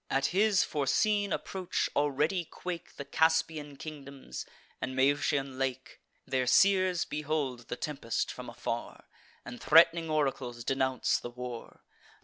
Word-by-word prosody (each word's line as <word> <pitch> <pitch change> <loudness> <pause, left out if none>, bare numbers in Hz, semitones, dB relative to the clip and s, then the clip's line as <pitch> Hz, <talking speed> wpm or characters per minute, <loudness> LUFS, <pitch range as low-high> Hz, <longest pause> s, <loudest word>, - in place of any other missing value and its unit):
At 135 0 +1
his 205 0 +4
foreseen 205 +8 +1
approach, 185 -2 -2
already 150 +5 +1
quake 175 +1 -7
The 140 - -7
Caspian 160 -1 +1
kingdoms 140 - -8 0.3
and 130 - -3
Maeotian 135 0 +1
lake: 130 -1 -3 0.3
Their 130 -1 0
seers 185 +2 +4
behold 145 -5 -3
the - - -3
tempest 135 -5 -2
from - - -8
afar, - - -5 0.4
And 120 - -8
threat'ning 165 +1 +5
oracles 135 -6 -1
denounce 130 +1 +1
the - - -6
war. 125 -1 -8
145 Hz, 125 wpm, -30 LUFS, 130-165 Hz, 0.4 s, threat'ning